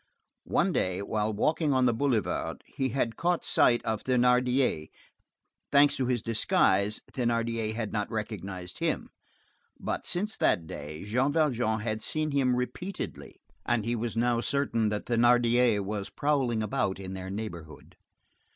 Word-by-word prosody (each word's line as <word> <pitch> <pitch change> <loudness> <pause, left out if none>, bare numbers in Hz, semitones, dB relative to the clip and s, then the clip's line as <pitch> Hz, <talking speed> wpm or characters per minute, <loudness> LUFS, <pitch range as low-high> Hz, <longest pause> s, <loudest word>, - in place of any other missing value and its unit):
One - - +2
day, 95 +1 0
while 105 +1 -1
walking 150 +7 +1
on 130 -1 +3
the 120 - +3
boulevard, 110 -8 -1
he 135 -1 -2
had 120 -2 -1
caught 175 0 0
sight 120 -1 +3
of 110 -2 -2
Thénardier; 125 - +2 0.8
thanks 140 0 +5
to 130 - 0
his 125 -3 0
disguise, 105 -2 +2
Thénardier 115 -2 -1
had 110 -2 -3
not 105 -1 -1
recognized 100 -5 -5
him; - - -1 0.7
but - - -3
since 210 +5 -1
that 85 - +2
day, 75 +2 -7
Jean 125 +7 +1
Valjean 125 -8 +1
had 110 0 -2
seen 155 +4 -1
him 130 -3 +2
repeatedly, 175 +10 -5 0.2
and 120 -3 0
he 120 +1 0
was 115 0 -3
now 120 0 +2
certain 120 -5 0
that 105 0 -3
Thénardier 120 -1 +3
was 100 0 -4
prowling 135 -7 0
about 110 -3 -1
in 95 -1 -6
their 95 0 -6
neighborhood. 85 -8 -7
115 Hz, 145 wpm, -28 LUFS, 105-130 Hz, 0.8 s, thanks